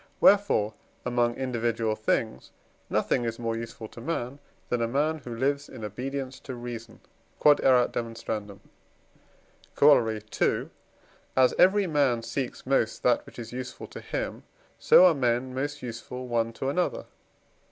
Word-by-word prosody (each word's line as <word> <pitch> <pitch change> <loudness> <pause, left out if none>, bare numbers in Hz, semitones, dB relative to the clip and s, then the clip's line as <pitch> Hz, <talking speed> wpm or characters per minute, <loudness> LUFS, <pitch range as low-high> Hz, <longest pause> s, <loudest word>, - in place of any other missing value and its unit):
wherefore 195 - +4 0.3
among 120 -1 +1
individual 115 -4 -1
things 110 - -1 0.4
nothing 120 - +1
is 115 -1 -3
more 115 -1 -2
useful 115 -1 -7
to 115 - -12
man, 135 -1 -3 0.3
than 120 -1 0
a 115 - +1
man 150 +6 0
who 120 -4 -7
lives 140 +4 -1
in 115 -4 -7
obedience 130 +5 -5
to 130 - -7
reason. 120 -1 -8 0.4
Q.E.D. 150 -1 +5 2.1
Corollary 115 -7 +5 0.2
II. - - +2 0.7
As 130 -1 +5
every 200 +2 +5
man 140 -8 +1
seeks 130 +2 -4
most 130 -4 +1
that 120 -1 +3
which - - -14
is 115 -1 -7
useful 125 0 -6
to - - -10
him, - - -4 0.4
so 185 - +7
are 180 - +6
men 125 -2 0
most 145 +2 -3
useful 125 +1 -6
one 115 -1 0
to 135 - -3
another. 180 +5 -1
125 Hz, 140 wpm, -27 LUFS, 115-140 Hz, 2.1 s, so